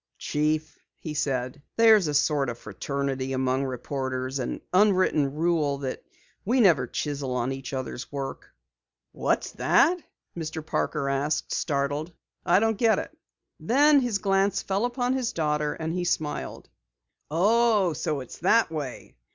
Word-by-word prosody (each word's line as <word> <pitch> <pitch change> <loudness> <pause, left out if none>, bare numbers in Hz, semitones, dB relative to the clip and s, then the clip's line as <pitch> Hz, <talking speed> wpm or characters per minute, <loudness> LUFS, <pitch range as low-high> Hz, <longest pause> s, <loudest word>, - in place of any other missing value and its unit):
"Chief," 155 +1 -1 0.2
he 155 - -6
said, 135 -2 -2
"there's 220 -5 +6
a 150 - -1
sort 145 -2 +2
of 120 - -5
fraternity 135 +4 -3
among 130 +1 0
reporters 130 0 -3
an 125 - -3
unwritten 185 -8 +3
rule 155 -3 +1
that 135 -2 -5 0.4
we 245 +6 +1
never 165 - +4
chisel 140 -1 -3
on 125 +1 -1
each 135 0 -6
other's 130 -1 -5
work." 140 -1 -6 0.6
"What's - - -1
that?" 350 +4 +3 0.3
Mr. 160 -1 -5
Parker 140 - -1
asked, 140 +3 -1
startled. 145 +2 -1 0.3
"I 180 +2 +4
don't 225 -1 0
get 225 -2 +4
it." - - -5 0.4
Then 285 +4 +5
his 245 -5 0
glance 195 0 +1
fell 195 +4 0
upon 245 +1 -1
his 255 -3 -1
daughter, 150 -2 0
and 160 0 -3
he 180 0 -1
smiled. 155 -3 -3 0.6
"Oh, 205 +2 +3
so 150 -1 -2
it's 130 - -10
that 210 +1 +3
way! 145 - -6
150 Hz, 145 wpm, -26 LUFS, 135-195 Hz, 0.6 s, there's